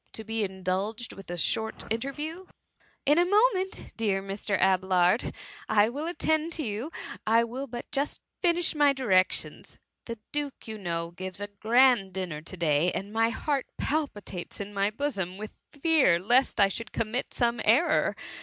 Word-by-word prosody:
to 220 - -4
be 225 0 -2
indulged 190 +4 -3
with 195 -2 -12
a 175 - -4
short 220 +6 0
interview.^^ 295 +9 -3
^^ - - -31 0.6
In 295 +4 +5
a - - +6
moment, 400 0 +1
dear 205 -4 +1
Mr. 195 0 -2
Abelard! 185 +1 +3 0.4
I 215 0 +4
will 300 +7 -3
fittendto 315 -2 0
you; 225 +8 -3 0.4
I 230 +1 +5
will 255 +4 -5
but 240 -1 -6
just 285 +1 -2 0.2
finish 345 -2 +2
my 290 -2 +4
direc* 190 -8 +3
tions. - - -3 0.3
The^ 230 -1 -5
duke, 290 -4 -4
you 220 -1 -6
know, 170 -3 -3
gives 185 +1 -6
a 205 - -2
grand 225 -1 +3
dinner 175 -5 -4
to 175 +3 -9
day, 165 +1 +2
and 200 +2 -5
my 225 0 +3
heart 275 +3 -1
palpitates 210 - -3
in 205 0 -6
my 200 0 +1
bosom 210 -7 -3
with 215 +1 -7 0.2
fear 295 - +3
lest 240 +8 +2
I 200 - +7
should 215 +3 -5
commit 230 +3 -2
some 235 -2 0
error. 295 +9 +3
225 Hz, 165 wpm, -28 LUFS, 195-280 Hz, 0.6 s, I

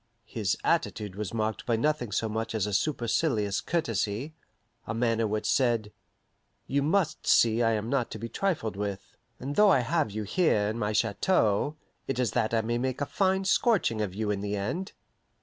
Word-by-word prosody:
His 105 -3 -1
attitude 105 -3 0
was 105 -1 -4
marked 110 -1 -2
by 120 - +2
nothing 125 -2 0
so 110 - 0
much 110 +1 -3
as 105 -3 +1
a 105 - -3
supercilious 115 -3 0
courtesy, 120 - -1 0.5
a 105 - -3
manner 115 -1 +1
which 105 0 -2
said, 115 -5 +1 0.7
You 140 +1 0
must 160 +1 0
see 115 0 +4
I 115 -1 +3
am 110 0 -2
not 130 -2 0
to - - -6
be 115 +2 -5
trifled 155 - -1
with; 100 -1 -5 0.2
and 140 +3 -4
though 210 -1 +6
I 135 - +5
have 155 +2 0
you 105 +1 -4
here 105 - +2
in 110 +2 -4
my 105 -1 0
chateau, 110 - +1 0.3
it 135 - -2
is 125 -2 +1
that 115 -3 0
I 115 -1 +2
may 120 +2 -1
make 130 0 -2
a 145 - 0
fine 190 +4 +1
scorching 190 - +2
of 95 -3 -3
you 105 0 -1
in 100 -1 -2
the 105 0 -2
end. 170 - -3
115 Hz, 190 wpm, -28 LUFS, 105-140 Hz, 0.7 s, though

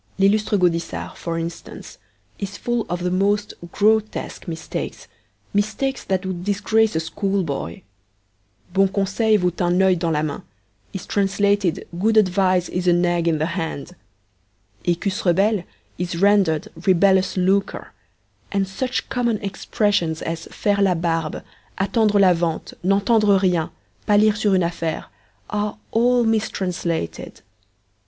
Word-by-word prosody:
L'lllustre 205 +2 +3
Gaudissart, 170 -2 -1
for 165 -1 -4
instance, 165 0 -7 0.4
is 200 0 -5
full 240 -1 -2
of 175 0 -3
the 180 - 0
most 205 +3 +1 0.2
grotesque 215 0 0
mistakes, 165 -1 -5 0.5
mistakes 215 +7 -1
that 190 0 -1
would 180 -2 -4
disgrace 210 +1 +1
a - - +2
schoolboy. 165 - -3 0.9
'Bon 195 +1 +4
conseil 200 +3 +1
vaut 180 -2 -1
un 175 +1 +2
oeil 190 -1 +4
dans 170 -1 -1
la 150 0 0
main' 150 -2 -3 0.5
is 190 - -6
translated 200 -2 +1
'Good 220 +3 +2
advice 185 -3 +3
is 180 0 -3
an 175 0 +4
egg 175 -1 +1
in 165 -2 +2
the 155 - 0
hand'! 160 -5 -4 0.9
'Ecus 185 +4 -1
rebelles' 195 +2 +2 0.3
is 175 -1 -2
rendered 195 -5 +3
'rebellious 190 +1 +3
lucre,' 195 +2 0 0.6
and 195 -1 0
such 250 +7 -3
common 235 -3 0
expressions 195 -4 -1
as 165 0 -4
'faire 205 -1 0
la 190 -2 +3
barbe,' 165 -2 -2 0.3
'attendre 205 +1 +2
la 185 -2 +6
vente,' 165 -1 -2
'n'entendre 200 +2 +3
rien,' 180 -4 +1 0.4
palir 210 0 +4
sur 205 -2 +2
une 185 - +3
affaire,' 165 -1 -3 0.5
are 210 0 -2
all 245 +2 +3
mistranslated. 185 - -2
190 Hz, 130 wpm, -21 LUFS, 175-205 Hz, 0.9 s, la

